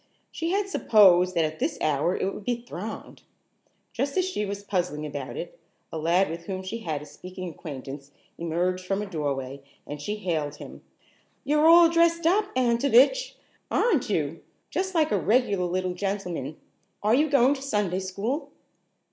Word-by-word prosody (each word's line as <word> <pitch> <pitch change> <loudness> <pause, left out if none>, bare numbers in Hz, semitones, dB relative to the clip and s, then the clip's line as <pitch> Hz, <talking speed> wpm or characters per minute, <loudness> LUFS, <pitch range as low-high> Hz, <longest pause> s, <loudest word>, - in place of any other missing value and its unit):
She 330 +1 -3
had 395 +2 0
supposed 185 - +5
that 165 -2 +3
at 155 0 -5
this - - -1
hour 155 +4 +1
it 195 - -1
would - - -8
be 240 +2 -2
thronged. 215 0 -7 0.7
Just 275 +3 -2
as 370 - +3
she 210 - -2
was 200 0 -5
puzzling 175 -7 -2
about 140 -3 -6
it, - - -7 0.3
a 160 - -4
lad 175 +5 +3
with 165 +1 -7
whom 190 -1 -4
she 220 +5 -5
had 155 -8 -4
a - - -10
speaking 185 +3 -9
acquaintance 140 -3 -8 0.3
emerged 175 +2 -1
from 195 +2 -1
a - - -4
doorway 140 -6 -3 0.2
and 145 0 -7
she 210 +8 -3
hailed 160 -8 -2
him: - - -11 0.6
"You're 300 +2 +3
all 340 0 +9
dressed 335 0 +2
up, 400 +5 +4
Antovich, 255 - +3 0.3
aren't 350 - +1
you? 160 -4 -1 0.3
Just 375 +3 -2
like 315 -2 +2
a 205 - +2
regular 205 -2 +2
little 185 +1 -1
gentleman. 180 -7 -3 0.5
Are 215 +2 +3
you 300 +5 +3
going 275 -1 +4
to 275 - -7
Sunday 205 -9 -1
school?" 200 - -3
195 Hz, 170 wpm, -26 LUFS, 165-270 Hz, 0.7 s, all